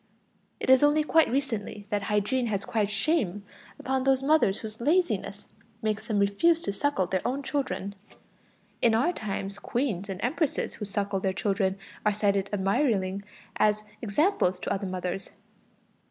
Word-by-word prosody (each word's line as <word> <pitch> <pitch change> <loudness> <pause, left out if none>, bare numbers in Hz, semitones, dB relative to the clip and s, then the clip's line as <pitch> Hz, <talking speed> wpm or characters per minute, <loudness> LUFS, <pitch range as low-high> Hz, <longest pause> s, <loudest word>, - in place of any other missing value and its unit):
It - - +2
is 260 - +7
only 295 +1 +4
quite 320 +1 +4
recently 230 -6 -2
that 205 -1 +1
hygiene 210 +5 +1
has 200 -3 -2
cried 220 -5 0
shame 210 - 0 0.3
upon 265 0 -1
those 270 0 +2
mothers 280 -9 +3
whose 220 0 -8
laziness 345 +7 +1 0.4
makes 215 0 -1
them 215 - 0
refuse 200 +13 +3
to 200 - -2
suckle 245 -4 +1
their 185 +1 -1
own 270 +3 -1
children; 265 -9 -2 0.9
in 230 -2 +4
our 290 +11 +2
times 200 - -4
queens 205 -5 -2
and 190 -1 -4
empresses 290 +4 0
who 210 - -6
suckle 200 -1 -1
their 190 0 0
children 195 -1 0 0.3
are 210 - +3
still 205 0 +1
cited 195 0 0
admiringly 195 -1 +1 0.4
as 215 0 +2 0.2
examples 220 - +1
to - - -1
other 195 0 -3
mothers. 185 +1 -4
210 Hz, 155 wpm, -28 LUFS, 195-265 Hz, 0.9 s, is